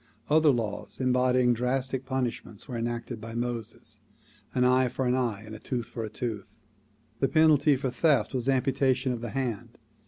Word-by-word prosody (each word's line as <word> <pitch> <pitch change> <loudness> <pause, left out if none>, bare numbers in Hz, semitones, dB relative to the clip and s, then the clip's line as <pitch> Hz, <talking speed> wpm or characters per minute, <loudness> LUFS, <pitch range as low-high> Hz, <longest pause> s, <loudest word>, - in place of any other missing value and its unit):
Other 155 0 +5
laws 110 -6 -2
embodying 125 -1 +3
drastic 130 +2 -1
pun 130 -1 0
ishments 110 -3 -7
were 125 - -5
enacted 120 -1 -3
by 115 +1 -7
Moses; 120 -2 -4 0.6
an 125 - +3
eye 130 0 +4
for 130 +2 -2
an 125 - +2
eye, 120 -5 -1
a 110 0 -9
tooth 120 -1 -4
for 115 - -5
a 110 - -4
tooth. 110 -3 -6 0.6
The 135 - +3
penalty 155 -2 +5
for 130 -1 -2
theft 150 +3 +2
was 130 0 0
amputation 130 0 +2
of 120 -2 -4
the 120 - -4
hand. 125 -6 -3
125 Hz, 175 wpm, -28 LUFS, 115-130 Hz, 0.6 s, Other